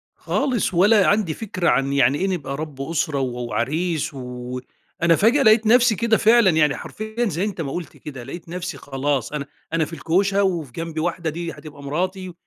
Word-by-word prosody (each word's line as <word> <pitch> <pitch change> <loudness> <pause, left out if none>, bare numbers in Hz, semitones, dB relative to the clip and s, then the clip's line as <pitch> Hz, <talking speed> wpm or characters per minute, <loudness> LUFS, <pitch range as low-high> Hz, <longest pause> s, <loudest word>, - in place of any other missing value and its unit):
خالص. 255 -8 -1
ولا 200 +3 +5
عندي 205 -6 +2
فكرة 185 -3 -1
عن 135 0 +2
يعني 140 0 +3
إيه 190 - 0
نبقى 150 -8 -3
رب 150 -3 -6
أسرة 150 0 -1
و 125 -2 -2
وعريس 155 +7 -1
و 125 -1 -6 0.4
أنا 170 0 +5
فجأة 235 - +4
لقيت 220 0 +5
نفسي 240 0 +5
كده 225 +1 +2
فعلًا 225 -2 +5
يعني 150 -3 +3
حرفيًا- 220 +3 -4
زي 170 +1 -2
أنت 200 -4 -3
ما 140 -4 -4
قُلت 175 +1 -6
كده- 135 -5 -8
لقيت 165 +7 -9
نفسي 175 -2 -5
خلاص، 140 -1 -2
أنا 145 -2 -3 0.3
أنا 165 -1 +2
في 165 - -11
الكوشة 195 +6 +1
وفي 170 -8 -1
جنبي 165 +3 -5
واحدة 170 0 -1
دي 170 +2 -4
هتبقى 150 -3 -11
مراتي 180 +5 -3
165 Hz, 190 wpm, -22 LUFS, 140-195 Hz, 0.4 s, ولا